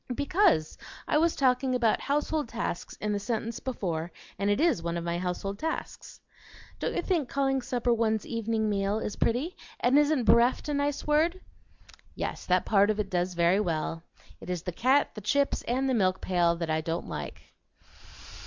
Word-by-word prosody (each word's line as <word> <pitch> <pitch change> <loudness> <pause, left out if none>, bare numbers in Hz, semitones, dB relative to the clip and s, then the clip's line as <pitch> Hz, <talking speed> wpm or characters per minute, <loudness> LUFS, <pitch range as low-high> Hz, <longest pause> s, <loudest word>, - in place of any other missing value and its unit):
"Because 285 - +2 0.3
I 300 - +3
was 335 +1 +2
talking 255 -1 +2
about 235 -3 +2
'household 295 -1 -1
tasks' 230 -6 -4
in 210 0 -2
the 205 - -1
sentence 230 +1 -3
before, 175 -10 -3 0.3
and 200 +1 +1
it 205 - +2
IS 320 - +2
one 170 0 -2
of 170 - -4
my 170 0 -2
household 185 +2 -3
tasks. 320 0 -5 0.6
Don't - - -2
you - - -1
think 330 -9 0
calling 270 -1 +1
supper 245 -1 0
'one's 220 -2 0
evening 225 -1 -1
meal' 200 0 0
is 210 - -4
pretty? 265 +10 0 0.2
and 255 +4 +4
isn't 295 -3 +2
'bereft' 235 +6 +3
a - - 0
nice 285 0 -1
word?" 320 +5 +2 0.8
"Yes, - - -4
that 180 0 +2
part 200 -1 +4
of 215 0 0
it 205 -1 -2
does 180 0 -1
very 170 +3 +3
well. 165 -3 -2 0.4
It - - -10
is 180 -2 -3
the 180 - -3
cat, 260 - +2
the 215 - -8
chips, 280 +7 +1
and 260 +3 0
the 260 - +1
milk 190 -5 +2
pail 175 -2 +2
that 165 -1 -3
I 155 0 +1
don't 165 +2 -3
like." - - -7
225 Hz, 185 wpm, -28 LUFS, 180-270 Hz, 0.8 s, and